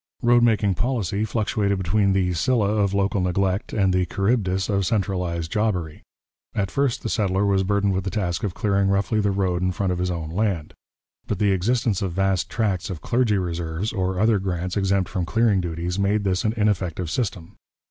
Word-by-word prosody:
Road 120 0 +5
making 110 -4 +3
policy 110 -2 -1
fluctuated 105 -2 0
between 95 +2 +1
the 90 -2 +1
Scylla 105 +4 +1
of 105 -2 +1
local 100 0 +1
neglect 95 +2 0
and 95 -3 +2
the 90 -1 +1
Charybdis 95 -1 0
of 100 -2 +1
centralized 90 -5 -1
jobbery. 90 -8 -1 0.5
At 95 -2 -1
first 140 -3 0
the - - -2
settler 100 -3 +1
was 100 -1 +2
burdened 100 0 +1
with 95 0 -1
the 95 - -2
task 90 -5 -2
of 100 -3 -2
clearing 100 -2 +1
roughly 100 +2 +1
the 100 -1 +1
road 95 -3 0
in 90 0 +1
front 95 0 -1
of 90 - -2
his 90 0 0
own 80 -3 -4
land, 95 -4 -1 0.5
but 105 - -1
the 100 +1 +2
existence 105 +2 +1
of 95 -3 -2
vast 95 -1 0
tracts 100 -6 -1
of 90 -4 -6
Clergy 120 -4 +1
Reserves, 85 +2 -3
or 95 -2 -1
other 110 0 +3
grants 90 -1 -3
exempt 95 -2 +1
from 90 - -2
clearing 110 0 +2
duties, 85 +2 -3
made 100 +1 +1
this 95 0 0
an 110 -1 +1
ineffective 90 -6 0
system. 95 -9 -3
95 Hz, 190 wpm, -23 LUFS, 90-105 Hz, 0.5 s, Road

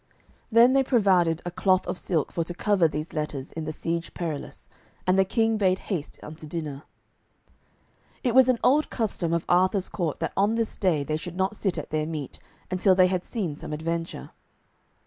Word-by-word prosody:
Then 235 +3 +6
they 270 - +5
provided 190 - +2
a 175 - -3
cloth 185 +1 +2
of - - -3
silk 170 -4 -1
for 170 - -1
to 175 - -6
cover 195 -3 +3
these 155 +1 -5
letters 150 -3 -4
in 160 -1 -5
the 155 - -3
Siege 165 +2 -4
Perilous, 160 -5 -5 0.4
and 185 - +3
the 195 - +5
King 225 +3 +1
bade 185 -2 +3
haste 175 -8 -5
unto 155 +1 -9
dinner. 150 -3 -5 1.4
It 245 - +1
was 260 0 +6
an 255 - +3
old 295 +4 +3
custom 200 -7 -1
of 170 -1 0
Arthur's 185 +2 +2
court 170 -6 -2
that - - -2
on 205 +3 +2
this 230 -1 -1
day 170 -7 +1
they 155 +2 -2
should 175 +2 -8
not 190 +3 0
sit 195 -4 -1
at - - -6
their 155 0 -1
meat 150 -5 -6 0.3
until 185 +1 +3
they 185 0 +6
had 180 -1 -1
seen 185 - -3
some 150 - -7
adventure. 165 - -4
180 Hz, 190 wpm, -26 LUFS, 160-200 Hz, 1.4 s, Then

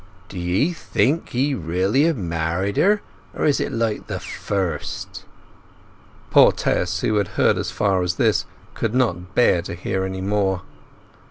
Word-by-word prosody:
"D'ye 95 - 0
think 145 0 0
he 135 +4 0
really 95 - +1
have 165 -4 +1
married 85 +1 -2
her?—or 205 +2 0
is 145 - +3
it - - -2
like 115 -2 -2
the - - -4
first—" 95 -7 -4 1.1
Poor - - +7
Tess, 90 +1 -1
who 110 - +1
had 100 -2 +1
heard - - +3
as - - -2
far 95 -2 +1
as 90 0 -1
this, 110 +1 +2 0.3
could 115 0 -2
not 95 -7 0
bear 90 -8 +4
to 85 - -6
hear 95 +2 -2
more. 95 0 -1
95 Hz, 145 wpm, -22 LUFS, 90-120 Hz, 1.1 s, Poor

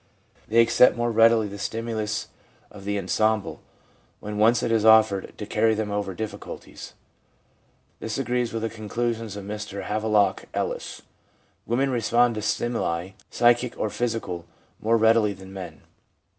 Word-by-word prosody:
They 115 +2 +5
accept 115 +2 +5
more 120 0 0
readily 115 -1 +4
the 100 0 -8
stimulus 110 -1 -3 0.4
of 100 -2 -12
the 100 0 -1
ensemble^ 110 +1 0 0.6
when 105 0 -5
once 115 +2 +4
it - - 0
is 110 -2 +2
offered, 110 -3 +4
to 105 - -5
carry 110 +1 +2
them 105 -1 -3
over 100 -2 -3
difficulties. 110 +1 -8 1.0
This 110 -1 -4
agrees 125 -2 -1
with 115 -1 -4
the 115 - -1
conclusions 115 0 -3
of 100 -1 -7
Mr 105 -1 -6
Havelock 105 -2 +1
Ellis: - - -4 0.6
1 120 - -1
Women 135 +1 +1
respond 120 +1 +2
to 110 - -4
stimuli, 100 -5 -1 0.2
psychic 120 0 +2
or 105 - -2
physical, 110 -8 -3 0.3
more 115 +2 +3
readily 110 -2 +4
than 95 0 -12
men. 90 -5 -8
110 Hz, 145 wpm, -25 LUFS, 105-115 Hz, 1.0 s, They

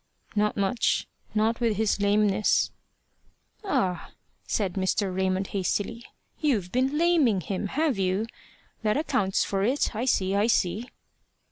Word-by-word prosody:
"Not 210 0 +1
much, 200 +4 +1 0.3
not 220 +2 +2
with 230 -4 +1
his 220 -2 +1
lameness" 205 0 +2 0.9
"Ah!" 240 - -1 0.3
said 195 -4 0
Mr. 190 0 0
Raymond, 190 0 0
hastily 205 +4 -2 0.3
"you've 220 - 0
been 260 +4 +1
laming 315 - +3
him 195 +3 -3
have 285 -1 0
you? 190 +3 +1 0.6
That 215 +1 +1
accounts 200 -11 +1
for 195 -1 -1
it. 245 +2 +1
I 230 +4 -1
see, 195 -6 +1
I 205 +2 +2
see." 225 +1 0
210 Hz, 130 wpm, -26 LUFS, 195-240 Hz, 0.9 s, laming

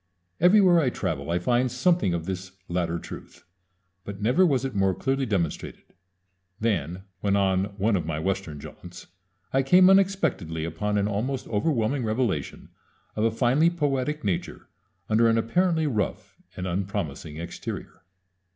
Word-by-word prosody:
Everywhere 180 0 +6
I 140 -6 +2
travel 70 - -3
I 85 - +1
find 120 +7 +1
something 130 - +2
of 80 -1 -4
this 95 0 -5
latter 85 -1 -1
truth; - - -10 0.6
but 100 -1 -7
never 125 - +3
was 135 -4 +1
it 135 - -3
more 95 -2 +1
clearly 135 0 -1
demonstrated 90 -7 -2 0.8
than 95 -5 -1 0.2
when 100 +1 +1
on 95 -1 +2
one 105 +2 +2
of 85 -4 -2
my 80 -2 -2
Western 95 -3 -3
jaunts 90 +4 -11 0.5
I 135 - +4
came 180 +7 +6
unexpectedly 165 - +1
upon 105 +6 -2
an 100 0 +1
almost 120 +6 -2
overwhelming 120 +3 0
revelation 110 - -2 0.5
of 110 - +1
a - - +4
finely 125 +8 +3
poetic 150 -3 -1
nature 95 -4 -3 0.4
under 115 +2 +4
an 115 - +3
apparently 160 +8 +1
rough 110 -9 -2 0.2
and 90 - -4
unpromising 85 -5 -3
exterior. 85 +1 -7
105 Hz, 145 wpm, -26 LUFS, 90-135 Hz, 0.8 s, Everywhere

